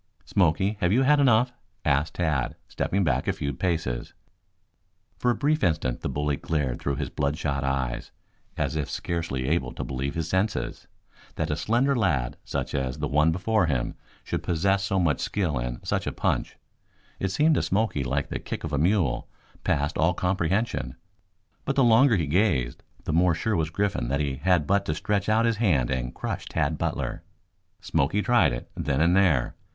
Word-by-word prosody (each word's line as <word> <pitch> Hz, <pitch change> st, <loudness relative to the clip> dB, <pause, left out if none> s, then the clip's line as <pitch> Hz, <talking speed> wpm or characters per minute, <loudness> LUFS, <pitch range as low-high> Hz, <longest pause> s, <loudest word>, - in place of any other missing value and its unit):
"Smoky, 95 Hz, +3 st, +2 dB
have 90 Hz, -1 st, +2 dB
you 125 Hz, +6 st, +4 dB
had 145 Hz, +2 st, +5 dB
enough?" 125 Hz, -2 st, +4 dB, 0.3 s
asked 70 Hz, +3 st, +1 dB
Tad, 75 Hz, -8 st, 0 dB
stepping 100 Hz, +1 st, -1 dB
back 65 Hz, -6 st, 0 dB
a -, -, +2 dB
few 70 Hz, -1 st, -3 dB
paces. 70 Hz, -7 st, -2 dB, 1.0 s
For 125 Hz, -, +2 dB
a 120 Hz, -, +3 dB
brief 150 Hz, +2 st, +1 dB
instant 75 Hz, -7 st, 0 dB
the -, -, -2 dB
bully 75 Hz, -1 st, -1 dB
glared 70 Hz, -6 st, -2 dB
through 70 Hz, -, -1 dB
his -, -, -4 dB
bloodshot 70 Hz, -1 st, -1 dB
eyes, 65 Hz, -3 st, -2 dB, 0.5 s
as -, -, -1 dB
if 75 Hz, -3 st, -2 dB
scarcely 80 Hz, -7 st, -3 dB
able 85 Hz, +4 st, 0 dB
to -, -, -5 dB
believe 65 Hz, +1 st, -3 dB
his 80 Hz, -1 st, -2 dB
senses. 95 Hz, +5 st, -1 dB, 0.5 s
That 80 Hz, 0 st, -2 dB
a -, -, +1 dB
slender 120 Hz, -, +1 dB
lad, 75 Hz, -, +1 dB
such -, -, -3 dB
as 65 Hz, -2 st, -2 dB
the -, -, -2 dB
one 75 Hz, +3 st, +3 dB
before 95 Hz, +2 st, +1 dB
him, 65 Hz, -5 st, -1 dB, 0.3 s
should -, -, -3 dB
possess 95 Hz, +4 st, +1 dB
so 95 Hz, 0 st, 0 dB
much 80 Hz, -6 st, +2 dB
skill 85 Hz, -10 st, -1 dB
and -, -, -4 dB
such -, -, -1 dB
a -, -, 0 dB
punch -, -, -1 dB, 0.6 s
it 95 Hz, -, 0 dB
seemed 150 Hz, -, +3 dB
to -, -, +2 dB
Smoky 100 Hz, -8 st, 0 dB
like 65 Hz, +2 st, -1 dB
the -, -, -3 dB
kick -, -, -6 dB
of 80 Hz, -2 st, -4 dB
a 70 Hz, -, +1 dB
mule 85 Hz, -, +1 dB, 0.3 s
passed 75 Hz, +3 st, 0 dB
all 85 Hz, +2 st, +3 dB
comprehension. 90 Hz, -, -1 dB, 0.7 s
But 140 Hz, -, -1 dB
the 135 Hz, -, +4 dB
longer 120 Hz, +1 st, +6 dB
he 85 Hz, -5 st, 0 dB
gazed 75 Hz, -, +1 dB, 0.2 s
the -, -, -2 dB
more 85 Hz, +1 st, +4 dB
sure 110 Hz, +5 st, -1 dB
was 80 Hz, -3 st, 0 dB
Griffin 100 Hz, -5 st, -1 dB
that 70 Hz, +3 st, 0 dB
he 70 Hz, -3 st, -1 dB
had 85 Hz, +1 st, +2 dB
but 100 Hz, +4 st, +2 dB
to 75 Hz, -, -1 dB
stretch 100 Hz, +5 st, -1 dB
out 110 Hz, +2 st, +3 dB
his 115 Hz, -2 st, +1 dB
hand 80 Hz, -, +2 dB
and 65 Hz, -1 st, -2 dB
crush -, -, -5 dB
Tad 75 Hz, +1 st, -1 dB
Butler. -, -, -2 dB, 0.6 s
Smoky 95 Hz, +10 st, +1 dB
tried 120 Hz, -, +4 dB
it -, -, -6 dB
then 70 Hz, -1 st, -1 dB
and 85 Hz, +3 st, +4 dB
there. 85 Hz, -11 st, +3 dB
80 Hz, 185 wpm, -26 LUFS, 70-100 Hz, 1.0 s, longer